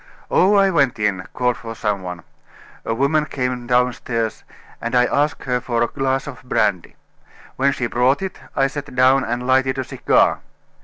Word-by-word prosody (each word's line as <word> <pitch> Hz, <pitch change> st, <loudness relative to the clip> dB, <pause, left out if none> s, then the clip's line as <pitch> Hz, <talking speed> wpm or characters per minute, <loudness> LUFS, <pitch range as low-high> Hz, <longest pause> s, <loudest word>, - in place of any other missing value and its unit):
"Oh! 195 Hz, +3 st, +4 dB
I 195 Hz, -1 st, +4 dB
went 140 Hz, -8 st, +2 dB
in; 100 Hz, -4 st, -1 dB
called 125 Hz, -1 st, 0 dB
for 115 Hz, -1 st, -8 dB
some 105 Hz, -3 st, -1 dB
one. 90 Hz, -1 st, -7 dB, 0.6 s
A 115 Hz, -, -1 dB
woman 150 Hz, +4 st, +1 dB
came 125 Hz, -2 st, -3 dB
downstairs, 125 Hz, -2 st, 0 dB, 0.4 s
and 115 Hz, +2 st, -2 dB
I 125 Hz, 0 st, +5 dB
asked 145 Hz, +3 st, 0 dB
her 125 Hz, -1 st, -1 dB
for 120 Hz, -1 st, 0 dB
a -, -, +1 dB
glass 135 Hz, 0 st, -1 dB
of 140 Hz, -3 st, -9 dB
brandy. 100 Hz, -7 st, -1 dB, 0.6 s
When 140 Hz, +1 st, +2 dB
she 125 Hz, -, -2 dB
brought 125 Hz, +7 st, +1 dB
it, 190 Hz, -, -5 dB, 0.2 s
I 135 Hz, -, +3 dB
sat 145 Hz, -1 st, -5 dB
down 130 Hz, +1 st, +4 dB
and 120 Hz, +2 st, -3 dB
lighted 130 Hz, +1 st, +2 dB
a 130 Hz, -, -1 dB
cigar. -, -, +2 dB
125 Hz, 175 wpm, -20 LUFS, 115-135 Hz, 0.6 s, I